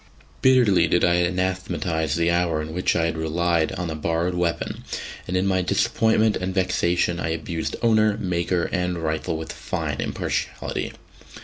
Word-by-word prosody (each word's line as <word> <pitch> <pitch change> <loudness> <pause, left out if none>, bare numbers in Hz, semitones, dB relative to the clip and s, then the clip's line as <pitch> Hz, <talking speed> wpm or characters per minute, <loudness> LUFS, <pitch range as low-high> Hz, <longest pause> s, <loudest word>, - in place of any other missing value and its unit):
Bitterly 115 -10 +5
did 85 - +3
I 85 0 +3
anathematise 90 -3 -1
the 85 0 +2
hour 85 -2 +1
in 75 +1 -5
which 90 - +1
I 80 - +2
had 80 -1 -2
relied 80 0 +1
on 90 -1 -3
a - - -2
borrowed 85 +3 -1
weapon, 85 -2 -2 0.4
and 90 - 0
in 95 - +1
my 95 -1 +2
disappointment 110 +4 +2
and 90 0 -3
vexation 90 -2 +1
I 80 - -2
abused 80 0 -3
owner, 110 -2 +4
maker, 90 -3 0
and 90 -1 -1
rifle 80 0 -1
with 80 0 -6
fine - - -3
impartiality. - - -3
85 Hz, 155 wpm, -24 LUFS, 80-95 Hz, 0.4 s, Bitterly